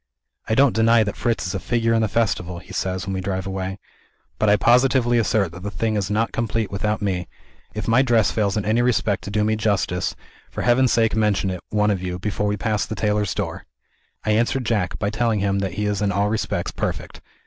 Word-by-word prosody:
"I 110 Hz, -, +2 dB
don't 135 Hz, +1 st, +5 dB
deny 115 Hz, 0 st, +4 dB
that 100 Hz, -, -4 dB
Fritz 115 Hz, -3 st, -1 dB
is 90 Hz, -, -3 dB
a 95 Hz, -, -2 dB
figure 115 Hz, +2 st, 0 dB
in 115 Hz, -, +2 dB
the 110 Hz, -, +2 dB
festival," 90 Hz, -6 st, -1 dB
he 90 Hz, +2 st, -11 dB
says, 95 Hz, -1 st, -2 dB
when 95 Hz, -, -3 dB
we 95 Hz, -, -2 dB
drive 95 Hz, -1 st, -3 dB
away; 95 Hz, 0 st, -4 dB, 0.6 s
"but 110 Hz, -, +3 dB
I 105 Hz, -, +6 dB
positively 120 Hz, +1 st, +3 dB
assert 100 Hz, -4 st, +1 dB
that 85 Hz, +1 st, -10 dB
the 105 Hz, -, -4 dB
thing 110 Hz, +1 st, -1 dB
is 100 Hz, -2 st, -1 dB
not 110 Hz, +2 st, 0 dB
complete 115 Hz, -2 st, -2 dB
without 105 Hz, +2 st, -1 dB
Me. 90 Hz, -3 st, -1 dB, 0.5 s
If 105 Hz, -, -4 dB
my 115 Hz, +3 st, +5 dB
dress 120 Hz, -5 st, +3 dB
fails 105 Hz, -2 st, 0 dB
in 105 Hz, -, -2 dB
any 110 Hz, +3 st, +2 dB
respect 110 Hz, -7 st, +1 dB
to -, -, -5 dB
do 105 Hz, +1 st, 0 dB
me 110 Hz, +1 st, +1 dB
justice, 100 Hz, -4 st, 0 dB, 0.3 s
for -, -, -5 dB
Heaven's 125 Hz, +1 st, +3 dB
sake 115 Hz, -2 st, +2 dB
mention 105 Hz, -3 st, +1 dB
it, 90 Hz, -2 st, -5 dB
one 105 Hz, 0 st, +2 dB
of 95 Hz, -3 st, -1 dB
you, 90 Hz, -1 st, -3 dB
before 105 Hz, +2 st, -2 dB
we 105 Hz, 0 st, 0 dB
pass 105 Hz, 0 st, 0 dB
the 110 Hz, -, -5 dB
tailor's 105 Hz, -2 st, 0 dB
door!" -, -, -4 dB, 0.6 s
I 110 Hz, -, +2 dB
answer 120 Hz, +4 st, +2 dB
Jack, 110 Hz, -7 st, -1 dB
by 100 Hz, -1 st, -1 dB
telling 115 Hz, -1 st, 0 dB
him 100 Hz, 0 st, 0 dB
that 95 Hz, -3 st, -2 dB
he 105 Hz, +1 st, -1 dB
is 105 Hz, -1 st, -1 dB
in 100 Hz, -1 st, +1 dB
all 100 Hz, +1 st, +1 dB
respects 110 Hz, 0 st, -2 dB
perfect. -, -, -4 dB
105 Hz, 230 wpm, -22 LUFS, 95-115 Hz, 0.6 s, I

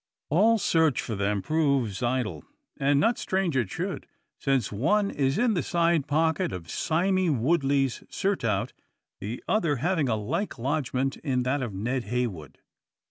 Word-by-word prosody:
All 215 Hz, +8 st, +5 dB
search 160 Hz, -, +2 dB
for 115 Hz, -, -3 dB
them 100 Hz, -1 st, -1 dB
proves 140 Hz, -10 st, +1 dB
idle. 125 Hz, -1 st, -1 dB, 0.3 s
And 140 Hz, 0 st, +2 dB
not 230 Hz, +10 st, +2 dB
strange 190 Hz, -5 st, 0 dB
it 120 Hz, -7 st, +1 dB
should; -, -, -4 dB, 0.3 s
since 135 Hz, -5 st, 0 dB
one 200 Hz, -, +1 dB
is 135 Hz, -1 st, 0 dB
in 240 Hz, 0 st, +3 dB
the 180 Hz, -, +1 dB
side 170 Hz, -4 st, +1 dB
pocket 160 Hz, +1 st, +1 dB
of 85 Hz, -3 st, -7 dB
Sime 175 Hz, -3 st, +1 dB
Woodley's 140 Hz, -4 st, +1 dB
surtout, 115 Hz, -, -1 dB, 0.5 s
the 110 Hz, +5 st, -6 dB
other 170 Hz, -9 st, +2 dB
having 160 Hz, 0 st, 0 dB
a 110 Hz, -, +2 dB
like 160 Hz, -, -3 dB
lodgment 135 Hz, +1 st, -1 dB
in 130 Hz, -4 st, -1 dB
that 135 Hz, +3 st, 0 dB
of 115 Hz, -6 st, -4 dB
Ned 120 Hz, +5 st, -2 dB
Heywood. 105 Hz, -, -3 dB
140 Hz, 150 wpm, -27 LUFS, 120-165 Hz, 0.5 s, All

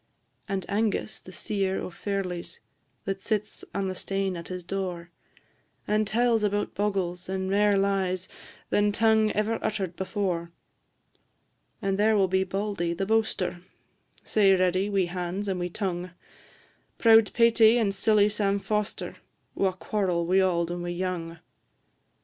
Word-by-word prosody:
And 195 Hz, -2 st, -2 dB
Angus, 215 Hz, +1 st, -1 dB
the 185 Hz, -, -13 dB
seer 195 Hz, 0 st, -1 dB
o' -, -, -5 dB
ferlies, 180 Hz, -3 st, -4 dB, 0.5 s
That 195 Hz, 0 st, -3 dB
sits 210 Hz, -1 st, -2 dB
on 195 Hz, -1 st, -2 dB
the 185 Hz, -, -2 dB
stane 195 Hz, 0 st, -2 dB
at 170 Hz, -1 st, -7 dB
his 180 Hz, -1 st, -6 dB
door, 180 Hz, -2 st, -4 dB, 0.8 s
And 215 Hz, 0 st, +1 dB
tells 230 Hz, +1 st, +2 dB
about 205 Hz, 0 st, 0 dB
bogles, 190 Hz, -3 st, -2 dB
and 190 Hz, 0 st, -2 dB
mair 205 Hz, 0 st, +4 dB
lies 190 Hz, -2 st, 0 dB, 0.4 s
Than 205 Hz, 0 st, +3 dB
tongue 220 Hz, 0 st, +3 dB
ever 215 Hz, +2 st, 0 dB
utter'd 195 Hz, -5 st, -2 dB
before. 185 Hz, -3 st, -2 dB, 1.3 s
And 195 Hz, 0 st, 0 dB
there 215 Hz, +1 st, +4 dB
will 195 Hz, -1 st, +4 dB
be 190 Hz, +1 st, +2 dB
Bauldy, 190 Hz, -3 st, -2 dB
the 195 Hz, -, -1 dB
boaster, 205 Hz, -5 st, 0 dB, 0.6 s
Sae 195 Hz, -3 st, +4 dB
ready 185 Hz, +2 st, +1 dB
wi' 195 Hz, -2 st, +2 dB
hands 180 Hz, +3 st, -4 dB
and 190 Hz, -2 st, -1 dB
wi' 175 Hz, -, -1 dB
tongue; 180 Hz, -1 st, -3 dB, 0.9 s
Proud 225 Hz, -2 st, +6 dB
Paty 230 Hz, 0 st, +5 dB
and 205 Hz, -4 st, +1 dB
silly 210 Hz, +1 st, +4 dB
Sam 205 Hz, -1 st, 0 dB
Foster, 210 Hz, +1 st, -3 dB, 0.4 s
Wha 195 Hz, -1 st, +1 dB
quarrel 185 Hz, -2 st, -1 dB
wi' 185 Hz, +3 st, +3 dB
auld 175 Hz, -3 st, +1 dB
and 175 Hz, 0 st, -4 dB
wi' 175 Hz, -, -4 dB
young. 175 Hz, -2 st, -3 dB
195 Hz, 145 wpm, -27 LUFS, 180-210 Hz, 1.3 s, Proud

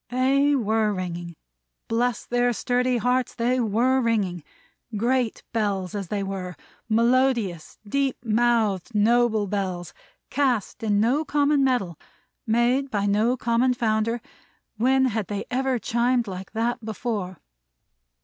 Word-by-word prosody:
They 275 Hz, +3 st, +2 dB
WERE 220 Hz, -3 st, +1 dB
ringing! 175 Hz, -2 st, -5 dB, 0.5 s
Bless 240 Hz, 0 st, 0 dB
their 245 Hz, 0 st, +1 dB
sturdy 250 Hz, +2 st, 0 dB
hearts, 250 Hz, +2 st, 0 dB
they 245 Hz, +2 st, +1 dB
WERE 245 Hz, +4 st, +2 dB
ringing! 200 Hz, -8 st, 0 dB, 0.5 s
Great 240 Hz, +1 st, 0 dB
Bells 200 Hz, -5 st, -1 dB
as 200 Hz, -3 st, -4 dB
they 200 Hz, +2 st, -2 dB
were; 190 Hz, -2 st, -5 dB, 0.3 s
melodious, 230 Hz, -6 st, +1 dB
deep 275 Hz, +3 st, 0 dB
mouthed, 220 Hz, -3 st, +1 dB
noble 220 Hz, 0 st, +3 dB
Bells; 185 Hz, -4 st, -3 dB, 0.4 s
cast 255 Hz, -5 st, 0 dB
in 210 Hz, -2 st, +1 dB
no 250 Hz, +8 st, +2 dB
common 290 Hz, -1 st, +2 dB
metal; 240 Hz, -, 0 dB, 0.5 s
made 240 Hz, +5 st, +2 dB
by 205 Hz, -4 st, -1 dB
no 215 Hz, +5 st, +2 dB
common 240 Hz, +2 st, +1 dB
founder; 225 Hz, 0 st, 0 dB, 0.6 s
when 265 Hz, +4 st, +3 dB
had 220 Hz, -5 st, -1 dB
they 205 Hz, -1 st, -4 dB
ever 260 Hz, 0 st, 0 dB
chimed 240 Hz, +1 st, +1 dB
like 190 Hz, 0 st, -7 dB
that 230 Hz, +1 st, -1 dB
before? 215 Hz, -4 st, -4 dB
230 Hz, 125 wpm, -24 LUFS, 205-250 Hz, 0.6 s, noble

